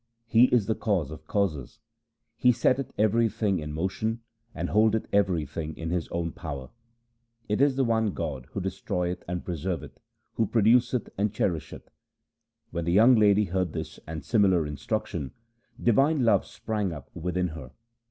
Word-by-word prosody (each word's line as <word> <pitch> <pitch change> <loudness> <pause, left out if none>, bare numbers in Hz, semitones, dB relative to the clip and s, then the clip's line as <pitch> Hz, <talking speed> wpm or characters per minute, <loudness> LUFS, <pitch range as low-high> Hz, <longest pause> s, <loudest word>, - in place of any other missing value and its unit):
He 115 +1 +6
is 120 -5 +2
the 110 - +1
Cause 95 - -1
of 80 0 -10
causes. 85 -11 -1 0.6
He 125 - +4
setteth 130 +2 +1
everything 110 -2 +2
in 75 -1 -5
motion, 95 +8 -2 0.3
and - - -3
hold 110 +1 +4
eth 110 - -2
everything 80 -6 0
in 80 0 -4
His 90 -2 -1
own 85 -1 -3
power. 70 -6 -7 0.8
It 105 +4 0
is 140 -2 +4
the 135 - +2
one 110 -4 +1
God 70 -6 -4
who 100 - -2
destroyeth 90 -1 -3
and 90 0 -4
preserveth, 90 0 -4 0.3
who 110 - +1
produceth 120 +3 +3
and 105 0 +1
cherisheth.' 85 -7 -3 0.8
When 85 -1 -3
the 85 - +1
young 115 +6 +7
lady 105 -2 +5
heard 90 -2 -1
this - - -6
and 80 0 -6
similar 95 -8 +3
instruction, 75 - -3 0.5
divine 135 +3 +3
love 115 - +3
sprang 105 -4 -3
up 75 -5 -9
within 90 +1 -1
her. 75 -5 -9
95 Hz, 155 wpm, -27 LUFS, 80-110 Hz, 0.8 s, young